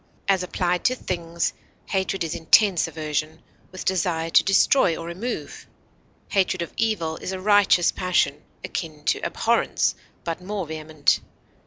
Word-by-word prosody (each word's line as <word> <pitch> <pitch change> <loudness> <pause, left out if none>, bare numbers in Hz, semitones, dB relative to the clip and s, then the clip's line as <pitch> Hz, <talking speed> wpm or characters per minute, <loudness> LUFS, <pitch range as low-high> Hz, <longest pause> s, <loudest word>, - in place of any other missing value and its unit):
As 195 -2 +3
applied 180 -1 -1
to 255 - +3
things, 170 -6 -2 0.3
hatred 190 -1 -1
is 165 -1 -3
intense 180 +2 +4
aversion, 155 0 -3 0.3
with 185 - -8
desire 165 -3 0
to - - +6
destroy 195 -2 +4
or 165 - -6
remove; 185 +9 -5 0.6
hatred 185 -2 +1
of 170 - -9
evil 190 -8 -1
is - - -5
a 190 - -4
righteous 205 -3 +4
passion, 180 -5 0 0.2
akin 155 -3 -5
to - - +1
abhorrence, - - +1 0.3
but 165 +1 -4
more 195 0 -4
vehement. 155 -1 0
175 Hz, 140 wpm, -24 LUFS, 160-190 Hz, 0.6 s, to